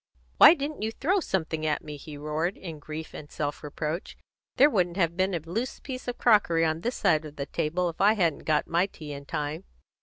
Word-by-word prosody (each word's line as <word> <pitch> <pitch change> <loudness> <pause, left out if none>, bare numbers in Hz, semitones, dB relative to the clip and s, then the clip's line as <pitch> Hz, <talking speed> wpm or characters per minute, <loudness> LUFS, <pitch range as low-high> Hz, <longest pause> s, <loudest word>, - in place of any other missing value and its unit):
"Why - - +10
didn't 290 -2 -4
you 220 +1 -1
throw 360 - +1
something 160 - -2
at 155 -1 0
me," 150 -1 -7
he 145 +1 -9
roared, 155 +5 -2
in 165 -5 -8
grief 155 +2 -7
and 145 - -9
self 145 -1 -3
reproach. 155 +4 -4 0.4
"There 275 - +7
wouldn't 180 - 0
have 170 -3 +1
been 185 0 +1
a - - -1
loose 205 - -4
piece 255 -2 -7
of 245 - -3
crockery 185 -8 +4
on 160 +1 -1
this 240 +6 -2
side 155 0 +2
of 150 -1 -10
the 140 - -4
table 165 +5 -1
if 165 - -5
I 205 +2 +6
hadn't 175 -8 0
got 155 -1 +2
my 170 +3 +1
tea 150 -6 -9
in 140 0 -8
time." 150 +2 -3
165 Hz, 220 wpm, -27 LUFS, 150-200 Hz, 0.4 s, Why